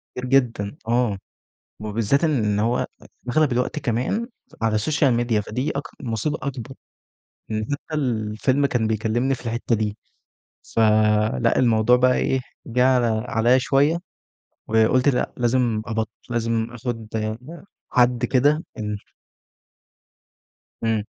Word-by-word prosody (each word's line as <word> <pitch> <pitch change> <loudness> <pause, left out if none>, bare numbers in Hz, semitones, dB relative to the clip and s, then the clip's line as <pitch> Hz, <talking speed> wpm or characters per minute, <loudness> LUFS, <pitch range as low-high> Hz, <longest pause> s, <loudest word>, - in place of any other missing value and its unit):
كتير 125 - -4
جدًا 125 -3 +1
آه. 120 -4 +1 0.6
وبالذات 110 +8 0
إن 110 -10 +1
هو 115 +3 +1 0.4
أغلب 150 0 +2
الوقت 125 +5 0
كمان 135 - -1 0.4
على 110 -1 +2
السوشيال 135 +3 +2
ميديا 120 -2 +1
فدي 125 +7 -3
أك 140 - -2 0.2
مصيبة 125 +5 -2
أكبر. 135 -2 -5 0.7
يعني 110 0 -2
حتي 145 +2 -4
الفيلم 125 0 0
كان 120 -5 0
بيكلمني 110 +4 0
في 125 - -10
الحتة 115 +1 0
دي. 105 -1 -2 0.8
ف - - +2 0.6
لأ 115 -1 +2
الموضوع 115 -1 +4
بقى 125 0 +3
إيه 130 - +1 0.3
جه 125 +2 +2
عل 130 -2 +3 0.2
عليّا 120 +3 +3
شوية، 140 +5 +2 0.7
وقُلت 110 +5 +3
لأ 125 -3 0
لازم 120 -2 +1
أبط 110 -2 -2 0.2
لازم 115 -1 0
أخد 120 -2 -5 0.8
حد 125 -1 +3
كده 145 +5 +2 0.2
إمم. 105 -1 -2 1.9
إمم. 110 -2 +1
120 Hz, 120 wpm, -23 LUFS, 110-130 Hz, 1.9 s, الموضوع